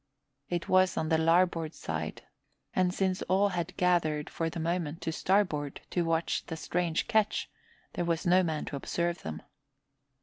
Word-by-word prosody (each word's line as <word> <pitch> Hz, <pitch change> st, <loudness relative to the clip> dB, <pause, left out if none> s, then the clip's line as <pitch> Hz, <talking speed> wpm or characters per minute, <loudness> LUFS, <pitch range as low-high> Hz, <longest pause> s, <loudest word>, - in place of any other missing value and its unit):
It 175 Hz, -1 st, -2 dB
was 185 Hz, 0 st, +4 dB
on 155 Hz, -, 0 dB
the 160 Hz, -1 st, +3 dB
larboard 165 Hz, -1 st, +2 dB
side, -, -, -4 dB, 0.5 s
and 185 Hz, -1 st, +3 dB
since 190 Hz, 0 st, 0 dB
all 195 Hz, +2 st, +4 dB
had 180 Hz, -1 st, -3 dB
gathered 160 Hz, -5 st, +1 dB
for 165 Hz, -1 st, -1 dB
the 170 Hz, -, -6 dB
moment 165 Hz, -1 st, -1 dB
to 160 Hz, -, -1 dB
starboard 160 Hz, -6 st, +1 dB
to 175 Hz, -, +1 dB
watch 165 Hz, 0 st, 0 dB
the 160 Hz, -, -4 dB
strange 170 Hz, 0 st, -1 dB
ketch, 220 Hz, -3 st, +1 dB, 0.4 s
there 175 Hz, -, -1 dB
was 170 Hz, -1 st, 0 dB
no 180 Hz, +1 st, +5 dB
man 160 Hz, -4 st, -1 dB
to -, -, -5 dB
observe 170 Hz, +5 st, -2 dB
them. 80 Hz, 0 st, -6 dB
170 Hz, 165 wpm, -30 LUFS, 160-185 Hz, 0.5 s, no